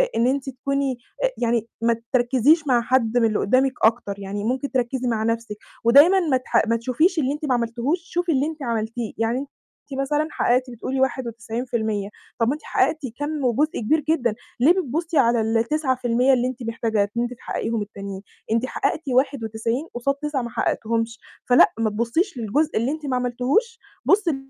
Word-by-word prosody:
إن 235 +2 +3
أنتِ 270 +1 -1
تكوني 270 0 -2 0.3
آآ - - +4
يعني 230 -1 0
ما 230 0 +3 0.2
تركّزيش 260 +5 +3
مع 245 -2 +4
حد 245 -2 +1
من 230 - +4
اللي 215 -2 +1
قدامِك 260 +4 +2
أكتر، 215 -3 +2
يعني 200 +1 -5
ممكن 260 +5 -1
تركّزي 255 0 -1
مع 220 -2 0
نفْسِك. 230 -1 -2 0.3
ودايمًا 290 +11 +7
ما 300 -7 +2
تح 255 - +1
ما 230 - +2
تشوفيش 285 - +1
اللي 275 0 +1
أنتِ 300 +1 -5
ما 260 - +1
عملتيهوش، 240 +7 0
شوفي 350 -1 -1
اللي 275 0 +2
أنتِ 315 -3 -6
عملتيه. 230 -1 -3
يعني 225 +3 0
أنتِ 275 -1 -10
مثلًا 295 +3 0
حققتِ 250 +1 +1
بتقولي 255 +3 -4
91% 230 -4 -2 0.3
طَب 230 - +2
ما 270 - +2
أنتِ 305 - -8
حققتِ 315 - +1 0.2
كَمّ 295 -1 -2
وجزء 285 +6 +1
كبير 300 +8 +2
جدًا، 240 -9 +1 0.2
ليه 285 +8 +6
بتبُصي 330 -2 -1
على 235 -3 +4
ال9% 250 +2 +1
اللي 250 0 +2
أنتِ 255 -1 -6
محتاجة 225 -3 -1
إن - - +2
أنتِ 240 +1 -3
تحققيهم 225 -2 -3
التانيين؟ 200 -1 -7 0.3
أنتِ 230 +3 +2
حققتِ 315 +4 -1
91 245 +1 0
قصاد 275 +3 0
9 295 -2 -2
ما 235 - -5
حققتيهمش. 230 0 -1 0.3
فلأ، 245 - +5
ما 220 -1 +2
تبُصيش 235 - -1
للجزء 275 +8 0
اللي 240 +5 +1
أنتِ 310 -1 -5
ما 260 -2 -1
عملتيهوش، 255 - 0 0.3
بُصي 385 -7 +3
250 Hz, 175 wpm, -23 LUFS, 230-280 Hz, 0.3 s, ودايمًا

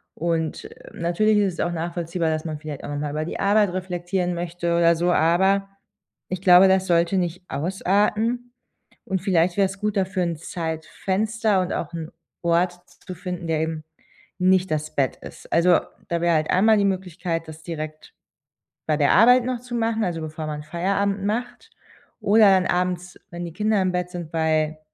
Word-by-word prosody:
und, 165 -1 -2
äh, - - -13
natürlich 210 +6 +1
ist 200 -3 +2
es - - -12
auch 175 - 0
nachvollziehbar, 170 0 -2
dass 155 0 -2
man 155 -2 -4
vielleicht 150 -2 -7
auch - - -6
noch 145 0 -3
mal 145 -1 -3
über 155 +1 -2
die - - -5
Arbeit 200 -2 +3
reflektieren 180 0 -2
möchte 170 0 -2
oder 170 0 +4
so, 175 +2 +1
aber 190 +5 +2 0.6
ich 185 0 -4
glaube, 185 0 +7
das 190 0 +2
sollte 170 +2 +2
nicht 180 0 -2
ausarten. 210 +8 0 0.5
Und 190 -1 -2
vielleicht 180 -2 +1
wäre 200 - +4
es 195 +1 -9
gut, 210 -1 -1
dafür 185 -1 0
'n 170 -2 -2
Zeitfenster 190 +6 -1
und 180 - -2
auch 170 +1 -4
'n 165 -1 -6 0.3
Ort 170 +1 +2 0.3
zu 185 - -6
finden, 180 -1 -6
der 160 -1 0
eben 160 -1 -3 0.6
nicht 185 0 +3
das 155 0 -3
Bett 135 -2 0
ist. - - -12
Also 170 0 +5 0.3
da 170 -1 -1
wäre 170 -1 +3
halt 155 0 0
einmal 215 +4 +4
die 200 - +2
Möglichkeit, 180 -3 -2
das 160 0 -11
direkt 155 -2 -7 0.7
bei 155 - +2
der 145 -2 +3
Arbeit 245 +5 +6
noch 255 -1 -2
zu 245 -1 -6
machen 225 -1 0
also 170 -2 -3
bevor 155 0 -5
man 150 -1 -5
Feierabend 195 +5 -1
macht, 240 +3 -3 0.5
oder 215 +2 +5
dann 185 -1 +3
abends, 180 0 -2
wenn 175 0 -6
die 170 - -8
Kinder 210 +1 +1
im 185 -1 +1
Bett 180 0 -2
sind, 175 -3 -7
weil 155 -1 0
175 Hz, 185 wpm, -23 LUFS, 165-195 Hz, 0.7 s, glaube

